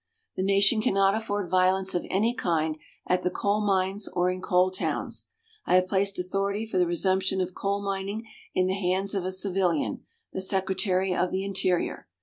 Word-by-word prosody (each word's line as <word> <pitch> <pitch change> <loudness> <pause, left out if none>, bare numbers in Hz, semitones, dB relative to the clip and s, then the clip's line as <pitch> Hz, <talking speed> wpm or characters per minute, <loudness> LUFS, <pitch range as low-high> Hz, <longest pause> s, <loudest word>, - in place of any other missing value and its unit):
The - - -2
nation 200 +3 +4
cannot 195 -2 +3
afford 205 -3 -2
violence 185 +1 +2
of 175 - -2
any 220 +5 +1
kind 160 -9 0 0.3
at 180 0 +1
the 180 - 0
coal 205 +3 0
mines 195 0 0
or 180 +1 0
in 185 0 -5
coal 185 -1 +2
towns. 185 - -2 0.4
I - - +4
have 185 0 +5
placed 195 +1 +1
authority 195 +4 -1
for 205 -4 -1
the 180 - +3
resumption 190 +2 +1
of 185 0 -2
coal 200 +2 -2
mining 200 +3 -3 0.3
in 185 - +3
the 185 - 0
hands 190 +1 -1
of 195 -3 -2
a 185 - -1
civilian, 185 -4 0 0.3
the 190 - -3
Secretary 190 0 +1
of 180 0 0
the 190 +1 -1
Interior. 185 -2 -1
190 Hz, 180 wpm, -27 LUFS, 185-200 Hz, 0.4 s, have